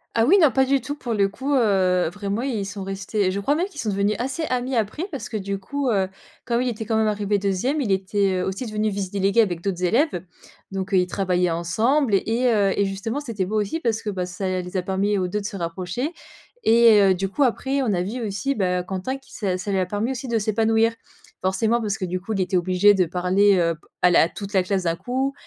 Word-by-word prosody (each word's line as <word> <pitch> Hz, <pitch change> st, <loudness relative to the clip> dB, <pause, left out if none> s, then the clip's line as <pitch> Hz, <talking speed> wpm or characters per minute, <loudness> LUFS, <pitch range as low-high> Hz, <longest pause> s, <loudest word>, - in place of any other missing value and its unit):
Ah 225 Hz, -, +4 dB
oui, 390 Hz, +7 st, +6 dB
non 310 Hz, -6 st, +5 dB
pas 265 Hz, +3 st, +3 dB
du 275 Hz, +1 st, +2 dB
tout, 260 Hz, +4 st, -5 dB
pour 245 Hz, -6 st, -4 dB
le 200 Hz, -1 st, +3 dB
coup, 265 Hz, +8 st, -3 dB
heu, 190 Hz, -7 st, +3 dB
vraiment 205 Hz, +4 st, -3 dB
ils 220 Hz, -8 st, -2 dB
sont 200 Hz, -1 st, -6 dB
restés 195 Hz, 0 st, -1 dB
je 200 Hz, -, -2 dB
crois 275 Hz, +9 st, +1 dB
même 340 Hz, +4 st, 0 dB
qu'ils 385 Hz, -7 st, -12 dB
sont 220 Hz, -, -2 dB
devenus 200 Hz, +1 st, +1 dB
assez 270 Hz, +6 st, -2 dB
amis 255 Hz, -1 st, -1 dB
après 225 Hz, -, -1 dB
parce 280 Hz, -, -5 dB
que, 220 Hz, -, -4 dB
du 200 Hz, 0 st, -3 dB
coup, 275 Hz, +7 st, -3 dB
heu, 195 Hz, -4 st, +2 dB, 0.4 s
comme 235 Hz, 0 st, +1 dB
il 255 Hz, -, 0 dB
était 220 Hz, -1 st, -5 dB
quand 220 Hz, 0 st, 0 dB
même 220 Hz, 0 st, +2 dB
arrivé 205 Hz, -1 st, 0 dB
2ème, 200 Hz, +10 st, 0 dB
il 215 Hz, -, -1 dB
était, 195 Hz, +1 st, +1 dB
heu, -, -, -1 dB
aussi 195 Hz, +6 st, -3 dB
devenu 215 Hz, 0 st, -1 dB
vice 195 Hz, -2 st, -3 dB
délégué 200 Hz, +3 st, +2 dB
avec 175 Hz, -6 st, -1 dB
d'autres 185 Hz, -2 st, -2 dB
élèves. 230 Hz, -, +1 dB, 0.5 s
Donc, 195 Hz, +1 st, -4 dB
heu, -, -, +5 dB
ils 180 Hz, 0 st, +2 dB
travaillaient 180 Hz, -2 st, 0 dB
ensemble 215 Hz, -, +1 dB
et 195 Hz, -, +3 dB
et 240 Hz, +2 st, +2 dB
heu, 200 Hz, -3 st, +2 dB
et 200 Hz, -, +3 dB
justement 200 Hz, +7 st, -3 dB
c'était 225 Hz, -9 st, -3 dB
beau 215 Hz, +3 st, -1 dB
aussi, 210 Hz, +10 st, -2 dB
parce 230 Hz, -7 st, -1 dB
que, 210 Hz, -, -2 dB
bah 180 Hz, -2 st, -3 dB
ça 185 Hz, 0 st, -2 dB
les 180 Hz, +1 st, -5 dB
a 180 Hz, -, -1 dB
permis 195 Hz, +2 st, 0 dB
aux 185 Hz, -1 st, 0 dB
2 210 Hz, +4 st, -2 dB
de -, -, -9 dB
se 200 Hz, -, -6 dB
rapprocher 180 Hz, -, -3 dB, 0.5 s
et 230 Hz, -2 st, +6 dB
heu, 195 Hz, -1 st, +5 dB
du 195 Hz, +2 st, -2 dB
coup, 200 Hz, +9 st, -4 dB
après 270 Hz, +2 st, 0 dB
on 240 Hz, -, 0 dB
a 175 Hz, -, 0 dB
vu 225 Hz, +7 st, -4 dB
aussi 215 Hz, +5 st, -2 dB
bah, 180 Hz, -6 st, 0 dB
Quentin 190 Hz, +8 st, -4 dB
qui 270 Hz, -, -20 dB
ça 190 Hz, -4 st, -1 dB
ça 185 Hz, +3 st, -4 dB
lui 195 Hz, -, +1 dB
a 185 Hz, -, +1 dB
permis 210 Hz, +6 st, -2 dB
aussi 260 Hz, 0 st, -5 dB
de 235 Hz, -2 st, +1 dB
s'épanouir. 225 Hz, +2 st, +2 dB, 0.5 s
Forcément, 220 Hz, +5 st, +1 dB
parce 205 Hz, -2 st, -2 dB
que 185 Hz, -, -3 dB
du 180 Hz, 0 st, -3 dB
coup 210 Hz, +4 st, -7 dB
il 200 Hz, -, -1 dB
était 185 Hz, 0 st, 0 dB
obligé 185 Hz, +3 st, +4 dB
de 190 Hz, -, +3 dB
parler, 185 Hz, +4 st, +3 dB
heu, 170 Hz, -1 st, +1 dB
p 155 Hz, -, -26 dB, 0.2 s
à 180 Hz, -, +6 dB
la 165 Hz, -1 st, +5 dB
toute 200 Hz, +2 st, -8 dB
la 190 Hz, -2 st, +3 dB
classe 190 Hz, 0 st, -1 dB
d'un 165 Hz, -1 st, 0 dB
coup, 260 Hz, +8 st, -2 dB
205 Hz, 255 wpm, -23 LUFS, 190-235 Hz, 0.5 s, oui